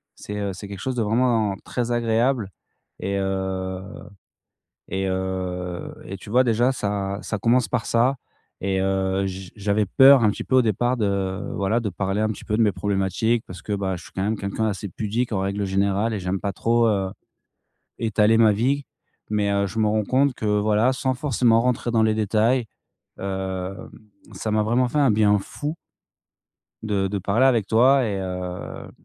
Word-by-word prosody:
C'est, 105 - -7
heu, 100 -1 -2
c'est 100 +3 -8
quelque 100 -1 -8
chose 130 -1 -2
de 120 - 0
vraiment, 110 -2 +2
très 120 -1 -3
agréable 115 -1 +1 0.5
et 100 0 -2
heu, 95 -1 -2 1.1
et 95 0 -2
heu, 95 -1 -3
et 95 - -6
tu 95 - -13
vois 125 +3 +4
déjà 120 +2 +2
ça 100 -4 -2
ça 105 - -3
commence 120 +4 +2
par 120 -3 -1
ça 125 +4 +2 0.4
et 95 0 0
heu, 95 0 0
j 95 -1 -6
j'avais 105 0 0
peur 135 +5 +7
un 105 - +5
petit - - -5
peu 130 - +1
au 130 - +6
départ 120 +3 +1
de 100 -3 -1
voilà, 100 +4 +1
de 115 - -2
parler 95 +2 -2
un 110 - +2
petit 110 - -6
peu 105 - -1
de - - +4
mes 105 - +4
problématiques, 100 +4 0
parce 90 - -10
que, 105 - -4
bah, 95 -2 -1
je - - -10
suis - - -14
quand 95 - -3
même 105 +3 0
quelqu'un 100 +2 -3
d'assez 100 -2 -2
pudique 115 +6 -2
en 95 - 0
règle 100 +1 -1
générale 100 +3 +1
et 105 - -2
j'aime 90 +1 -2
pas 100 - -2
trop, 115 +4 +2
heu, 100 -3 +1 0.9
étaler 110 0 +3
ma 110 -2 +6
vie, 130 +7 0 0.4
mais 105 -1 +1
heu, 100 0 +1
je 95 +4 -4
me 110 - +3
rends 105 0 +1
compte 135 +5 +2
que 110 - -6
voilà, 105 +3 +2
sans 130 0 -1
forcément 125 -4 +2
rentrer 125 -1 0
dans 115 -1 +3
les 110 0 +3
détails, 110 +4 +2 0.5
hem, 95 -1 -4 0.4
ça 105 +3 -4
m'a 110 0 +2
vraiment 120 +4 +2
fait 150 - -2
un 140 -4 +4
bien 105 -1 +4
fou 145 +10 -5 1.1
de 100 -3 0
de 100 +1 -2
parler 100 +7 +2
avec 115 -6 +2
toi 130 +5 +4
et 100 -4 -2
heu, 90 -1 -6
105 Hz, 190 wpm, -23 LUFS, 95-115 Hz, 1.1 s, peur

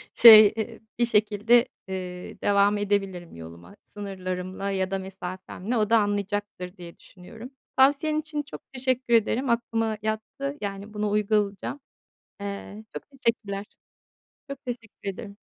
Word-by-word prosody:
şey, 215 -2 +11
eee, 225 +1 -4 0.2
bir 240 - +4
şekilde, 220 +2 +3 0.2
eee, 180 -1 -6
devam 205 0 +3
edebilirim 195 - -2
yoluma. 85 - -11
Sınırlarımla 185 -1 -5
ya 190 -1 -1
da 195 - -1
mesafemle 190 +4 -5
o 210 -2 +1
da 230 - +6
anlayacaktır, 205 -2 -2
diye 170 -1 -11
düşünüyorum. 220 +7 -12 0.3
Tavsiyen 285 +3 +4
için 300 -1 -4
çok - - -10
teşekkür 255 -1 0
ederim. 235 +3 +2
Aklıma 225 -2 0
yattı, 220 +7 -3
yani, 200 +1 -5
bunu 210 0 -1
uygulayacağım. 210 +3 0 0.6
Eee, 200 +2 -6
çok - - -5
teşekkürler. 215 -6 -2 0.8
Çok 275 0 -8
teşekkür 230 -4 -6
ederim. 200 +1 -8
205 Hz, 130 wpm, -26 LUFS, 195-230 Hz, 0.8 s, şey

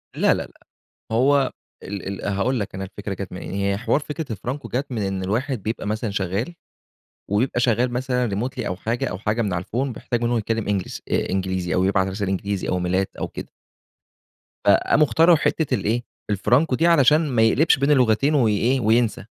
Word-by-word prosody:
لا، - - +4
لا، - - -2
لأ، - - -17 0.5
هو 135 +3 +3 0.3
ال 100 0 -6
ال - - -2
هاقول 105 +5 0
لك 100 - -5
أنا 95 0 -4
الفكرة 100 +1 -6
جات 95 0 -7
منين. 90 - -7
هي 100 0 0
حوار 125 +5 +1
فكرة 150 -2 -5
الفرانكو 125 +8 -5
جات 135 +2 -3
من 110 -3 -2
إن 95 -1 -2
الواحد 115 +5 -2
بيبقى 110 +1 -3
مثلًا 110 +1 -2
شغّال 100 - -2 0.8
ويبقى 120 +4 +1
شغّال 120 +1 +2
مثلًا 125 0 0
remotely 115 +7 -3
أو 90 - -2
حاجة، 115 +5 -2
أو 90 - -4
حاجة 105 +3 0
من 100 -4 -1
على 90 0 -2
الPhone 125 +8 -2
بيحتاج 120 -1 -3
إنّه 120 0 +1
يتكلّم 115 0 -2
English 100 -3 -2
آآ، - - 0
إنجليزي 95 -2 -1
أو 90 - +2
يبعت 95 +1 0
إنجليزي 100 0 -2
أو - - +1
إيميلات 90 +2 0
أو - - -3
كده. - - -8 1.1
فقاموا 100 +9 +4
اخترعوا 165 +3 +5
حتّة 155 0 0
الإيه 110 +5 -1 0.3
الفرانكو 125 - +2
دي 165 +6 +2
علشان 155 -1 +4
ما 120 -4 +2
يقلبش 130 +9 +4
بين 140 +2 +2
اللغتين 130 +1 +3
وإيه، 120 +1 +2
وينسى. 115 -1 +1
110 Hz, 185 wpm, -22 LUFS, 100-130 Hz, 1.1 s, اخترعوا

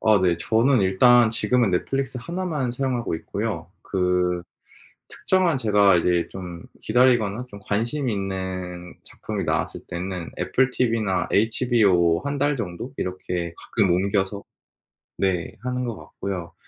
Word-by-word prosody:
아 105 -3 +4
네. 90 -2 +2
저는 115 +6 +2
일단 115 +5 +5
지금은 120 -2 +1
넷플릭스 130 +8 -1
1 175 +7 -4
만 140 -8 -1
사용하고 125 -6 -1
있고요. - - -4
그 90 -1 0 0.7
특정한 185 -6 +1
제가 105 -5 +4
이제 85 0 +1
좀 90 -3 -8 0.2
기다리거나 120 -1 +2
좀 100 - -10
관심 120 +7 -1
있는 95 -3 -4
작품이 - - -5
나왔을 - - -1
때는 90 0 -5
애플TV나 115 -7 +1
HBO 105 -6 +3
1 140 0 -3
달 145 0 +1
정도? 105 +4 -5
이렇게 90 -2 -3
가끔 100 -6 0
옮겨서 100 +2 0 0.7
네 95 +2 -1
하는 125 0 -2
것 115 -3 -3
같고요. 90 -4 -6
100 Hz, 265 characters per minute, -24 LUFS, 90-125 Hz, 0.7 s, 일단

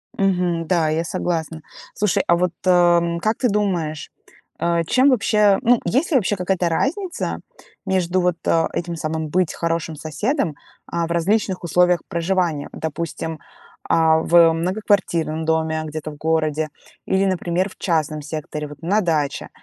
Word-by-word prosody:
Мгм, 180 -4 0
да, 165 -3 +2
я 160 +2 0
согласна. 165 -2 -3 0.3
Слушай, 210 -2 +1
а 170 - +5
вот, 180 0 0
эм, 175 -2 +3
как 215 +5 0
ты 250 - +1
думаешь, 180 -7 -1 0.5
э, 170 0 +1
чем 260 +3 +4
вообще, 210 -5 +3
ну, 240 0 +4
есть 295 +8 +1
ли 285 - +5
вообще 205 -3 +1
какая-то 180 -1 0
разница 345 - -2 0.5
между 185 -1 +1
вот, 180 -1 +1
э, 165 -1 +3
этим 170 0 -3
самым 160 -1 -3
"быть 180 +1 +1
хорошим 165 -1 -2
соседом", 160 - -2 0.3
а, 170 0 -1
в - - -6
различных 190 +3 0
условиях 180 +1 +3
проживания? 170 -3 -1
Допустим, 160 0 -4 0.5
а, 160 -1 +4
в 165 0 +5
многоквартирном 170 -3 0
доме, 160 0 0
где-то 155 0 -6
в 150 - -12
городе, 155 -1 0 0.4
или, 190 +1 +1
например, 185 0 0
в - - -17
частном 155 -3 -1
секторе, 150 0 -5
вот 145 0 -12
на 200 +6 +1
даче. 155 -6 -1
170 Hz, 150 wpm, -21 LUFS, 160-190 Hz, 0.5 s, а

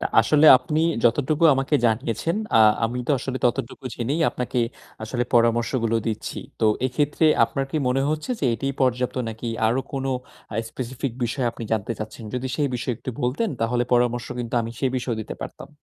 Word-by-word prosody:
তা - - 0
আসলে 150 +7 +4
আপনি 150 +4 -1 0.2
যতটুকু 145 +7 +2
আমাকে 135 +2 0
জানিয়েছেন, 115 - 0 0.2
আ - - +7 0.3
আমি 120 +2 -2
তো - - -1
আসলে 130 +1 -4
ততটুকু 120 +1 -1
জেনেই 135 +7 -2
আপনাকে 125 0 -3 0.4
আসলে 120 +2 -2
পরামর্শগুলো 115 0 +2
দিচ্ছি। 110 -2 -3 0.2
তো 110 - +4 0.2
এক্ষেত্রে 145 +5 0 0.2
আপনার 135 +4 -2
কি - - -2
মনে 130 +2 +1
হচ্ছে 155 +8 -3
যে, - - -1
এটিই 135 +4 -3
পর্যাপ্ত 125 -1 +1
নাকি 115 +2 -6 0.2
আরো 120 +4 +2
কোন 135 -1 -3 0.5
আ - - -6 0.2
specific 130 0 -4
বিষয় 120 +2 -1
আপনি 115 - -7
জানতে 110 +1 0
চাচ্ছেন? 110 +1 -7
যদি 125 +1 -2
সেই 145 -2 +1
বিষয় 125 +1 -2
একটু 130 - -5
বলতেন 140 - 0
তাহলে 120 +2 +1
পরামর্শ 120 0 +2
কিন্তু 120 -1 -4
আমি 115 - -5
সেই 130 - +1
বিষয়েও 120 -3 -2
দিতে - - -7
পারতাম। - - -8
125 Hz, 180 wpm, -23 LUFS, 115-135 Hz, 0.5 s, আ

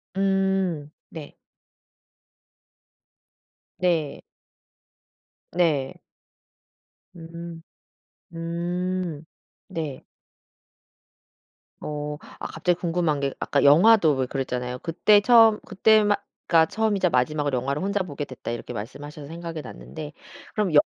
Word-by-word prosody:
음. 190 -5 +1 0.2
네. 155 -3 -10 2.4
네. 165 -6 0 1.3
네. 155 -7 +1 1.2
음. 170 0 -9 0.7
음. 170 0 -3 0.5
네. 160 -8 -5 1.8
어. 150 0 -4 0.2
아 - - -4
갑자기 175 +2 -1
궁금한 170 -4 0
게 140 -1 -1
아까 140 - +1
영화도 160 +2 +6
왜 130 -1 0
그랬잖아요. 125 -1 -3
그때 205 +7 +4
처음 225 -1 +6
그때 215 +3 +4
마 205 0 +3 0.3
가 165 -1 +6
"처음이자 205 0 +1
마지막으로 145 +1 +1
영화를 140 +4 -2
혼자 200 +2 0
보게 145 -5 -5
됐다." 130 -4 -7
이렇게 120 +1 -6
말씀하셔서 140 +6 -7
생각이 165 0 -6
났는데 150 +3 -9 0.4
그럼 205 -6 0
여 150 - +8
165 Hz, 200 characters per minute, -25 LUFS, 145-185 Hz, 2.4 s, 여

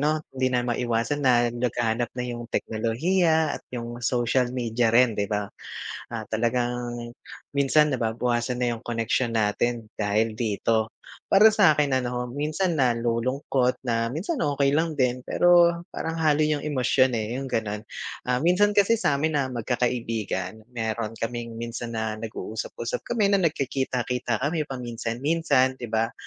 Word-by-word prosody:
'no, 155 +1 +1
hindi 130 -1 +1
na 125 -1 0
maiwasan 120 +3 -1
na 120 -3 +4
laganap 120 -1 -1
na 125 - -2
yung 120 -1 -6
teknolohiya 160 +10 +1
at - - -37
yung 120 -1 -5
social 120 +1 +1
media 120 -1 +1
rin, 120 +1 +5
'di 100 -1 -1
ba. 105 -1 -2 0.6
Ah, 110 -2 -4
talagang 120 +1 -2 0.4
minsan 150 +2 +4
nababawasan 120 +1 -1
na 120 -1 0
yung 110 - -15
koneksyon 115 +1 0
natin 110 +1 0
dahil 110 +1 0
dito. 110 0 0 0.4
Para 205 +3 +8
sa 205 -7 +5
akin, 145 -3 +1
ano, 125 0 -3
minsan 155 +7 -1
nalulungkot 125 +1 +1
na 115 -1 0
minsan 190 - -2
okey 140 -1 +2
lang 160 0 +1
din, 125 -3 0
pero 175 -1 +4
parang 165 0 -4
halo 155 -1 +3
yung 150 -1 +1
emosyon, 130 -3 +2
eh, 110 +2 -2
yung 135 - -5
ganon. 105 -3 -2 0.5
Ah, 125 - +3
minsan 205 +4 +3
kasi 205 +3 +5
sa'min 150 0 +1
na 140 -3 +1
magkakaibigan 115 -5 -2
meron 115 -2 -3
kaming 115 0 -4
minsan 115 0 -5
na 110 -1 -1
nag-uusap-usap 110 +1 -5
kami 210 -4 +2
na 200 - +4
nagkikita-kita 130 -6 -1
kami 155 +1 0
paminsan-minsan, 130 +3 0
'di 120 - -5
ba. 115 +1 +1
125 Hz, 145 wpm, -25 LUFS, 115-145 Hz, 0.6 s, Para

